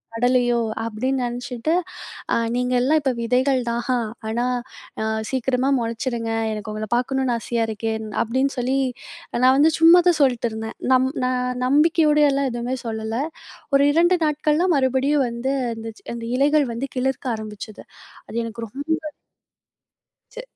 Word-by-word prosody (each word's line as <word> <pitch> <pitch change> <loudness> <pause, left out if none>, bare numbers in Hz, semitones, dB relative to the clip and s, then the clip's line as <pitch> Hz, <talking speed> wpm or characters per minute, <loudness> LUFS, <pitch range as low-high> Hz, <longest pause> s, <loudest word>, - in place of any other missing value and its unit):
நடலையோ?" 245 0 +2 0.3
அப்படின்னு 255 +4 -1
நினைச்சிட்டு, 245 +4 -3 0.6
அ - - +4 0.2
"நீங்கள்லாம் 250 +4 +2
இப்போ 270 -2 +1
விதைகள் 255 +3 +2
தான் 235 0 -1
ஹா. 255 - +2 0.3
ஆனா, 235 +2 0 0.6
அ - - 0 0.3
சீக்கிரமா 260 0 0
முளைச்சிடுங்க. 230 0 -3 0.2
எனக்கு 215 0 -5
உங்கள 215 0 -4
பார்க்கணும்னு 255 0 0
ஆசையா 230 0 -1
இருக்கேன்", 220 0 -3 0.2
அப்படின்னு 260 +4 0
சொல்லி, 255 +2 0 0.7
நான் 260 +1 +6
வந்து 305 +3 +5
சும்மா 335 +2 +8
தான் 335 -3 +1
சொல்ட்டுருந்தேன். 230 -4 0 0.2
நம் 260 0 +3 0.2
நான் 250 0 -1
நம்பிக்கையோடயெல்லாம் 295 -1 +3
எதுவுமே 240 +2 -3
சொல்லல. 225 +2 -2 0.5
ஒரு 275 0 +5
2 345 +4 +4
நாட்கள்லாம் 305 +3 +2
மறுபடியும் 265 +1 +2
வந்து, 235 +3 -2 0.2
அந்த 225 0 -7
சி - - -33
அந்த 230 -1 -6
இலைகள் 290 +1 +3
வந்து, 260 +4 -3
"கிளுர்க்க" 260 -1 -1
ஆரம்பிச்சது. 215 0 -9 0.4
அது - - -7
எனக்கு 230 0 -6
ரொம்ப 305 +5 -3 1.2
ச்சு. - - -7
255 Hz, 135 wpm, -22 LUFS, 230-275 Hz, 1.2 s, சும்மா